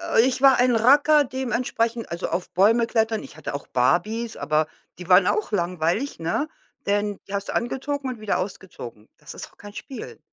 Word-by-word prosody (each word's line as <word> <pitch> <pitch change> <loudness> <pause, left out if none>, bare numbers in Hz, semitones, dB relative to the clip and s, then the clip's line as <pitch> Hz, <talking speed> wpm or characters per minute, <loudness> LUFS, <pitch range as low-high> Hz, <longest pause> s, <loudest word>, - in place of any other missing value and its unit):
Äh, - - +8
ich 260 0 0
war 270 -2 +7
ein 250 -1 +3
Racker 290 +6 +5
dementsprechend, 240 -3 -2
also, 170 - -3
auf 175 +2 -3
Bäume 225 +5 +4
klettern. 220 -2 0
Ich 155 - -12
hatte 155 - -6
auch 140 - -6
Barbies, 215 - 0
aber 155 0 +1 0.3
die 180 +1 -9
waren 180 +1 +6
auch 430 - 0
langweilig, 180 - -1
ne, 170 - -1 0.4
denn 205 0 0
die 195 - -9
hast 200 0 -3
du - - -3
angezogen 270 +3 -2
und 245 - -6
wieder 215 -1 -1
ausgezogen. 175 - -7
Das - - -11
ist - - -7
doch - - -26
kein 205 0 -11
Spiel. 260 +4 -8
220 Hz, 190 wpm, -24 LUFS, 180-250 Hz, 0.4 s, Äh